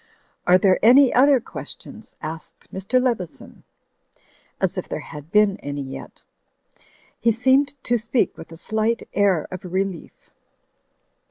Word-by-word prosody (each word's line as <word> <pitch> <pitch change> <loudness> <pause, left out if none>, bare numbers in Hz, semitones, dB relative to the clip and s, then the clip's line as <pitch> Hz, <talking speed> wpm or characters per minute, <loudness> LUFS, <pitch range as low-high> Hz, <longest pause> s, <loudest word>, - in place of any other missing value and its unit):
"Are 180 +1 +7
there 185 0 +3
any 255 +3 +7
other 270 +2 +5
questions?" - - -10
asked 160 0 -9
Mr. 195 +7 +1
Leveson 235 -9 -3 0.5
— - - -37 0.3
as - - 0
if - - -5
there - - -3
had 150 +2 -10
been 210 -2 +4
any 145 -4 -5
yet. 135 0 -9 1.0
He 230 - +3
seemed 265 +5 +2
to 240 -1 +1
speak 225 +3 0
with 165 - -12
a 165 - -10
slight 220 +5 -1
air 195 -6 +2
of 185 +1 -7
relief. 185 -1 -4
205 Hz, 140 wpm, -22 LUFS, 180-240 Hz, 1.0 s, Are